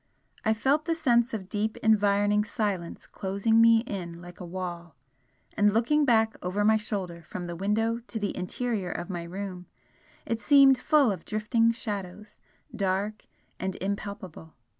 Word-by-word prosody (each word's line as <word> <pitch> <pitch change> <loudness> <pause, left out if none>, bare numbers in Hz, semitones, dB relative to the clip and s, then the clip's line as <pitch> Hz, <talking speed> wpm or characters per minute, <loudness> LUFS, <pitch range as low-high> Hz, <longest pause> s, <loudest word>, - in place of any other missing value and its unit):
I 220 0 +2
felt 275 +7 +1
the 330 -1 0
sense 245 -6 +2
of 200 -5 -5
deep 215 +2 -2
environing 205 -1 +3
silence 205 -6 -3
closing 200 +4 +1
me 230 0 +6
in 175 -7 -6
like 175 0 -12
a 180 - -7
wall 175 -2 -6 0.6
and 210 0 +4
looking 295 +6 +3
back 225 -3 +3
over 195 +3 -1
my 220 +1 +5
shoulder 195 -5 -4
from 175 +2 -7
the 175 -1 -5
window 220 +5 0
to 230 - -5
the 205 -2 -2
interior 200 0 -2
of 175 +1 -5
my 175 -2 -3
room 180 +1 -6 0.6
it 230 - -2
seemed 270 +3 +6
full 290 -7 +4
of 185 -4 -5
drifting 225 +2 +1
shadows, 205 -3 -6 0.4
dark 200 +1 -2 0.3
and 190 0 -3
impalpable. 195 -4 -6
205 Hz, 155 wpm, -27 LUFS, 185-225 Hz, 0.6 s, me